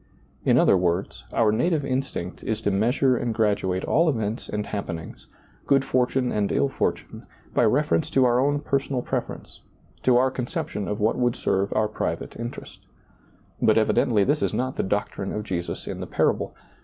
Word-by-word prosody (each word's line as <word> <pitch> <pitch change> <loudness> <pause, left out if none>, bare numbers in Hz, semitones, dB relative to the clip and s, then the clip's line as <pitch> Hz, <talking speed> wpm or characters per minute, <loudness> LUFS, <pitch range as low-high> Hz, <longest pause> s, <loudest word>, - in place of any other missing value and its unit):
In - - +4
other - - +5
words, 90 0 -1
our 110 -2 +3
native 150 +7 +1
insdnct 130 -9 -3
is 110 -1 -1
to 100 - 0
measure 125 +6 +2
and 120 -2 -2
graduate 100 -4 0
all 165 +2 +3
events 110 -5 -2
and 105 0 -2
happenings, 85 -5 -6 0.4
good 135 -1 +3
fortune 125 0 +1
and 105 -1 0
ill 140 - +2
fortune, - - -3 0.3
by - - +3
reference 85 0 +2
to 130 -1 +3
our 120 0 +3
own 145 +2 +1
personal 140 -3 -1
preference, - - -5 0.4
to 125 -1 +4
our 130 +1 +3
conception 120 -5 -4
of 105 - -3
what 110 +4 +1
would 120 -1 +2
serve 95 +1 0
our 110 - +2
private 105 - -4
interest. 120 +1 -8 0.8
But - - +4
evidently 105 -4 +3
this 145 +6 +1
is - - 0
not 130 +1 -1
the - - 0
doctrine 100 0 -2
of 105 - -3
Jesus 85 -4 -4
in - - -5
the - - -5
parable. - - 0
115 Hz, 175 wpm, -25 LUFS, 100-130 Hz, 0.8 s, other